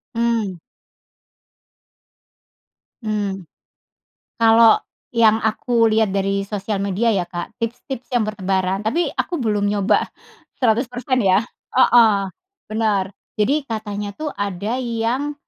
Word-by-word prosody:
Mmm. 230 Hz, -5 st, 0 dB, 2.5 s
Hmm. 200 Hz, -4 st, -2 dB, 1.0 s
Kalau 225 Hz, 0 st, +6 dB, 0.3 s
yang 220 Hz, -1 st, +5 dB
aku 230 Hz, +1 st, +2 dB
lihat 220 Hz, -1 st, +3 dB
dari 195 Hz, 0 st, 0 dB
sosial 200 Hz, 0 st, -3 dB
media 205 Hz, +4 st, +1 dB
ya, 185 Hz, -3 st, 0 dB
Kak, 175 Hz, -1 st, -6 dB
tips-tips 240 Hz, +2 st, -5 dB
yang 245 Hz, -4 st, +1 dB
bertebaran 190 Hz, -2 st, -1 dB
tapi 305 Hz, +11 st, 0 dB
aku 345 Hz, -, -2 dB
belum 210 Hz, -5 st, 0 dB
nyoba 205 Hz, 0 st, +1 dB, 0.5 s
100% 245 Hz, +2 st, +1 dB
ya 190 Hz, -1 st, +4 dB, 0.4 s
Heeh, 220 Hz, -7 st, +4 dB, 0.4 s
benar, 205 Hz, -3 st, 0 dB, 0.2 s
jadi 275 Hz, +9 st, +2 dB
katanya 210 Hz, -2 st, -4 dB
tuh 305 Hz, -1 st, -3 dB
ada 205 Hz, +4 st, -3 dB
yang, 240 Hz, +5 st, -1 dB
215 Hz, 105 wpm, -20 LUFS, 200-235 Hz, 2.5 s, Kalau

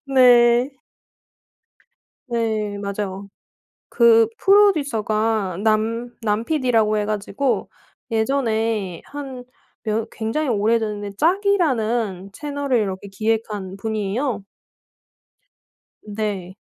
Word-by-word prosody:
네. 245 Hz, -1 st, +5 dB, 1.6 s
네 220 Hz, -3 st, -1 dB
맞아요. 200 Hz, -1 st, -4 dB, 0.6 s
그 230 Hz, -2 st, +5 dB
프로듀서가 225 Hz, -, +2 dB
남 225 Hz, +2 st, +1 dB
남 215 Hz, +1 st, 0 dB
PD라고 235 Hz, -8 st, +2 dB
해 210 Hz, -, 0 dB
가지고 215 Hz, +6 st, -1 dB, 0.4 s
예전에 220 Hz, -5 st, 0 dB
한 270 Hz, -3 st, -8 dB, 0.4 s
몇 220 Hz, +1 st, -1 dB
굉장히 230 Hz, +7 st, -2 dB
오래됐는데 210 Hz, -2 st, 0 dB
짝이라는 245 Hz, -, +1 dB
채널을 285 Hz, -1 st, -1 dB
이렇게 195 Hz, -2 st, -3 dB
기획한 210 Hz, -2 st, -2 dB
분이에요. 215 Hz, +2 st, -2 dB, 1.6 s
네. 205 Hz, -3 st, -4 dB
225 Hz, 185 characters per minute, -21 LUFS, 210-250 Hz, 1.6 s, 네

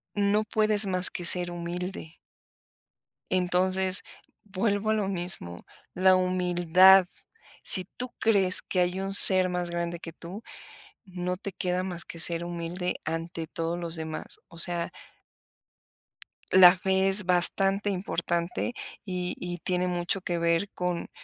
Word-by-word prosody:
no 205 Hz, +1 st, 0 dB
puedes 215 Hz, -1 st, +1 dB
más 185 Hz, -1 st, +1 dB
que 175 Hz, -, -7 dB
ser 175 Hz, 0 st, +5 dB
humilde. 175 Hz, -1 st, -7 dB, 1.1 s
Entonces, 185 Hz, +1 st, 0 dB, 0.4 s
vuelvo 205 Hz, +2 st, -2 dB
a -, -, +1 dB
lo 210 Hz, -3 st, -2 dB
mismo, 175 Hz, -, -5 dB, 0.3 s
la 185 Hz, +1 st, +3 dB
humildad. 185 Hz, 0 st, +3 dB, 0.6 s
Si 185 Hz, -2 st, +6 dB
tú 250 Hz, 0 st, -4 dB
crees 195 Hz, -5 st, +4 dB
que 185 Hz, -, -4 dB
hay 180 Hz, +1 st, -1 dB
un 195 Hz, 0 st, -4 dB
ser 185 Hz, -2 st, +10 dB
más 180 Hz, -1 st, -4 dB
grande 170 Hz, 0 st, -5 dB
que 165 Hz, -2 st, -10 dB
tú, 185 Hz, +7 st, -11 dB, 0.6 s
no 180 Hz, -1 st, -5 dB
te 200 Hz, 0 st, -8 dB
queda 180 Hz, -1 st, -3 dB
más 175 Hz, -2 st, -3 dB
que 170 Hz, -, -10 dB
ser 170 Hz, 0 st, 0 dB
humilde 175 Hz, +1 st, -5 dB
ante 165 Hz, 0 st, -6 dB
todos 165 Hz, +1 st, -5 dB
los 170 Hz, -1 st, -5 dB
demás. 160 Hz, -1 st, -7 dB
O 170 Hz, 0 st, -13 dB
sea 170 Hz, 0 st, +2 dB, 1.6 s
la 185 Hz, -1 st, +6 dB
fe 190 Hz, +1 st, 0 dB
es 195 Hz, 0 st, +3 dB
bastante 195 Hz, +3 st, +1 dB
importante 175 Hz, +2 st, -4 dB, 0.3 s
y 180 Hz, -3 st, -5 dB
y 175 Hz, 0 st, -7 dB
tiene 180 Hz, -1 st, -1 dB
mucho 175 Hz, +2 st, -2 dB
que 175 Hz, -2 st, -4 dB
ver 170 Hz, +3 st, -1 dB
con 180 Hz, -1 st, -5 dB
180 Hz, 140 wpm, -25 LUFS, 175-190 Hz, 1.6 s, ser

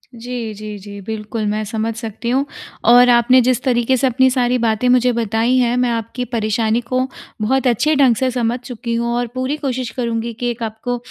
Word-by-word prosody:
जी, 235 Hz, -1 st, -5 dB
जी, 210 Hz, 0 st, -7 dB
जी। 200 Hz, +1 st, -10 dB
बिल्कुल, 220 Hz, 0 st, -4 dB
मैं 215 Hz, +1 st, -1 dB
समझ 220 Hz, +1 st, -2 dB
सकती 230 Hz, 0 st, -5 dB
हूँ 265 Hz, +3 st, +1 dB, 0.5 s
और 245 Hz, +1 st, +7 dB
आपने 245 Hz, +2 st, +5 dB
जिस 250 Hz, -1 st, +1 dB
तरीके 255 Hz, 0 st, +2 dB
से 265 Hz, +2 st, +2 dB
अपनी 260 Hz, +1 st, +3 dB
सारी 250 Hz, -1 st, +1 dB
बातें 225 Hz, +1 st, +1 dB
मुझे 250 Hz, 0 st, +4 dB
बताई 230 Hz, +2 st, +1 dB
हैं 245 Hz, -1 st, +2 dB
मैं 250 Hz, -1 st, +2 dB
आपकी 230 Hz, +2 st, -3 dB
परेशानी 225 Hz, -1 st, 0 dB
को 255 Hz, +2 st, -1 dB, 0.4 s
बहुत 260 Hz, +4 st, +1 dB
अच्छे 290 Hz, +6 st, +2 dB
ढंग 265 Hz, -4 st, +4 dB
से 260 Hz, +4 st, 0 dB
समझ 240 Hz, 0 st, -1 dB
चुकी 240 Hz, -1 st, -6 dB
हूँ। 235 Hz, 0 st, -1 dB
और 245 Hz, 0 st, -1 dB
पूरी 260 Hz, +3 st, -1 dB
कोशिश 255 Hz, -4 st, -3 dB
करूँगी 235 Hz, -1 st, -2 dB
कि 245 Hz, -, -1 dB
एक 235 Hz, 0 st, -6 dB
आपको 225 Hz, +3 st, -3 dB
240 Hz, 200 wpm, -18 LUFS, 225-250 Hz, 0.5 s, और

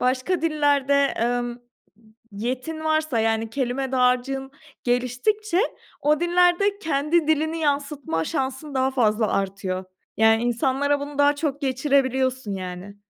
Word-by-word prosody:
başka 260 Hz, +7 st, 0 dB
dillerde, 290 Hz, -3 st, +2 dB, 0.2 s
emm, 240 Hz, +1 st, 0 dB
m -, -, -11 dB, 0.8 s
yetin 255 Hz, +9 st, -4 dB
varsa, 310 Hz, -5 st, +1 dB
yani, 225 Hz, 0 st, 0 dB
kelime 260 Hz, +1 st, -2 dB
dağarcığın 260 Hz, +1 st, +1 dB, 0.3 s
geliştikçe 255 Hz, -, 0 dB, 0.4 s
o 300 Hz, 0 st, +2 dB
dillerde 355 Hz, +3 st, +3 dB
kendi 315 Hz, -1 st, +1 dB
dilini 315 Hz, +1 st, +1 dB
yansıtma 280 Hz, -, -1 dB
şansın 265 Hz, -, -3 dB
daha 260 Hz, 0 st, +2 dB
fazla 220 Hz, -4 st, +2 dB
artıyor. 190 Hz, -1 st, -2 dB, 0.3 s
Yani, 225 Hz, +1 st, +4 dB
insanlara 265 Hz, +4 st, +1 dB
bunu 285 Hz, 0 st, -7 dB
daha 285 Hz, 0 st, +5 dB
çok 285 Hz, -2 st, -2 dB
geçirebiliyorsun, 260 Hz, -3 st, 0 dB
yani. 185 Hz, +1 st, -7 dB
265 Hz, 120 wpm, -23 LUFS, 240-300 Hz, 0.8 s, daha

